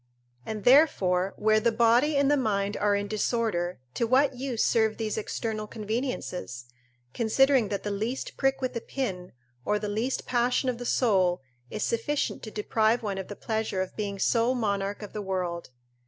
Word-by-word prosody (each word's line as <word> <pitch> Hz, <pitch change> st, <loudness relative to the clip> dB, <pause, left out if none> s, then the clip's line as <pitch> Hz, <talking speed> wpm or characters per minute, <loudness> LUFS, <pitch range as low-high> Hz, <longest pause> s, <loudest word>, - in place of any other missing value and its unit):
And 215 Hz, -2 st, -4 dB
therefore 195 Hz, -, +4 dB
where 215 Hz, 0 st, +3 dB
the 235 Hz, +1 st, +2 dB
body 240 Hz, +6 st, +3 dB
and 280 Hz, 0 st, +3 dB
the -, -, +5 dB
mind 205 Hz, -6 st, 0 dB
are 205 Hz, -1 st, +2 dB
in 200 Hz, 0 st, -2 dB
disorder, 210 Hz, -5 st, -1 dB, 0.2 s
to 235 Hz, -, 0 dB
what 265 Hz, +2 st, +3 dB
use 250 Hz, -3 st, -1 dB
serve 220 Hz, -1 st, +2 dB
these 220 Hz, -2 st, -2 dB
external 215 Hz, 0 st, -3 dB
conveniences: 215 Hz, -, -4 dB, 0.5 s
considering 255 Hz, +1 st, +3 dB
that 200 Hz, 0 st, -3 dB
the 205 Hz, -, -2 dB
least 220 Hz, +6 st, -3 dB
prick 270 Hz, 0 st, +1 dB
with 255 Hz, -, -2 dB
a 235 Hz, -, -2 dB
pin, 190 Hz, -11 st, -4 dB, 0.3 s
or 210 Hz, -, +1 dB
the 210 Hz, 0 st, -4 dB
least 220 Hz, +6 st, -2 dB
passion 250 Hz, +1 st, +1 dB
of 240 Hz, -2 st, -3 dB
the 245 Hz, -, -4 dB
soul, 185 Hz, -, +2 dB, 0.3 s
is 215 Hz, -, -3 dB
sufficient 235 Hz, +6 st, -1 dB
to 220 Hz, -, -7 dB
deprive 220 Hz, +2 st, +1 dB
one 200 Hz, -2 st, -2 dB
of 190 Hz, -, -6 dB
the 205 Hz, -, -7 dB
pleasure 220 Hz, -3 st, -2 dB
of 185 Hz, -, -10 dB
being 200 Hz, -2 st, -3 dB
sole 235 Hz, +5 st, +2 dB
monarch 200 Hz, -3 st, -2 dB
of 205 Hz, -, -9 dB
the 210 Hz, -, -4 dB
world. 180 Hz, -3 st, -3 dB
220 Hz, 180 wpm, -27 LUFS, 200-245 Hz, 0.5 s, the